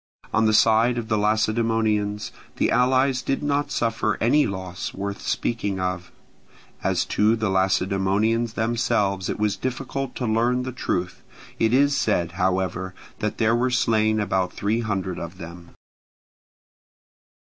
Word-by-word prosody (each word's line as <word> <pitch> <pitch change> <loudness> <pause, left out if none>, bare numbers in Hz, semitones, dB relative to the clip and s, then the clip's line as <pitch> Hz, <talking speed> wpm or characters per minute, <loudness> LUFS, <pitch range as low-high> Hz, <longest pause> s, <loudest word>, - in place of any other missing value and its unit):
On 110 0 +3
the 110 - +2
side 115 +2 +4
of 115 -2 -4
the 110 - +2
Lacedaemonians, 110 -1 0 0.2
the - - +1
allies 130 +1 +3
did 135 +3 -2
not 145 0 0
suffer 115 -2 0
any 145 +6 +3
loss 95 -2 -5
worth 100 +1 -4
speaking 100 -5 -2
of: 90 -1 -3 0.7
as - - +1
to 105 +2 +2
the 110 -3 -1
Lacedaemonians 95 +4 +1
themselves 105 -5 0
it - - -2
was 105 -1 0
difficult 135 +1 -4
to 125 - -3
learn 120 +3 +1
the 130 - -4
truth; 90 -7 -3 0.4
it 110 - +2
is 140 +3 +3
said, 90 -9 0
however, 95 0 -1 0.2
that 105 0 -2
there 115 0 +2
were 125 +2 +1
slain 110 -4 +2
about 95 -3 0
three 105 +3 -1
hundred 95 -5 -3
of 85 +2 -7
them. 85 -1 -11
110 Hz, 140 wpm, -24 LUFS, 95-120 Hz, 0.7 s, side